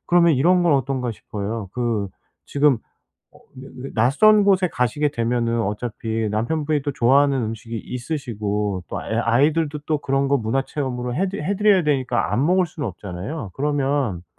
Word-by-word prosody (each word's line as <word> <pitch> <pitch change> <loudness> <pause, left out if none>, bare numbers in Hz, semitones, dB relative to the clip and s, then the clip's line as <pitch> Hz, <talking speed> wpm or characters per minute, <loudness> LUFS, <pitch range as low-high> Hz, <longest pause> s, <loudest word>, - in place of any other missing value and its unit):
그러면 170 -2 +4
이런 175 +7 +3
건 170 - +3
어떤가 130 -2 -1
싶어요. 105 0 -5
그 115 -5 -1 0.4
지금 145 -3 +3 0.5
어 - - -18 0.2
왜 135 +1 -10 0.2
왜 135 - -5
낯선 150 - +5
곳에 190 -2 +4
가시게 145 +4 0
되면은 115 -1 0
어차피 110 +1 -3
남편분이 145 +7 -1
또 145 - -2
좋아하는 135 +2 +3
음식이 115 +1 -5
있으시고, 105 - -3
또 - - -4
애 - - -4
아이들도 145 +6 +2
또 155 -1 +1
그런 135 0 0
거 140 - +3
문화 120 +4 0
체험으로 125 -4 -4
해 190 +7 0
드 195 - -5
해 185 +5 -2
드려야 205 -4 +4
되니까 130 - 0
안 120 +6 +2
먹을 180 +3 +3
수는 150 -5 -5
없잖아요. 100 - -6
그러면 135 - -1
130 Hz, 350 characters per minute, -22 LUFS, 115-150 Hz, 0.5 s, 낯선